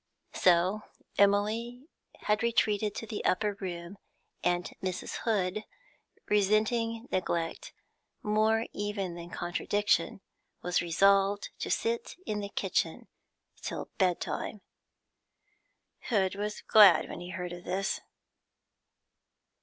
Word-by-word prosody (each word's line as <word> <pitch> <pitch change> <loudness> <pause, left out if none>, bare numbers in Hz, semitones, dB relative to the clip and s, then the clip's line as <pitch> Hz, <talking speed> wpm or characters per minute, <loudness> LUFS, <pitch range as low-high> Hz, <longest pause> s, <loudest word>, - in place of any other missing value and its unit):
So 185 +4 +3 0.4
Emily 215 +5 +2 0.4
had 210 0 +1
retreated 215 -3 +1
to - - -4
the 215 -1 -5
upper 205 +2 +1
room, 185 -1 -6 0.4
and 175 0 +1 0.2
Mrs. 185 -1 -3
Hood, 210 -2 0 0.6
resenting 220 +3 +1
neglect 170 -3 -2 0.5
more 220 +2 +2
even 205 -3 -3
than 170 0 -8
contradiction, 195 +4 0 0.4
was 180 0 +1
resolved 195 +4 +3
to - - -3
sit 465 0 -1
in 210 -1 -2
the 200 -1 -4
kitchen - - -1 0.5
till - - -5
bedtime. 190 +2 -1 1.5
Hood 190 -5 +2
was 210 +1 -4
glad 200 -7 +7
when - - -7
he 175 0 -8
heard 180 -2 -5
of 175 0 -9
this. 195 +2 -1
200 Hz, 105 wpm, -30 LUFS, 180-215 Hz, 1.5 s, glad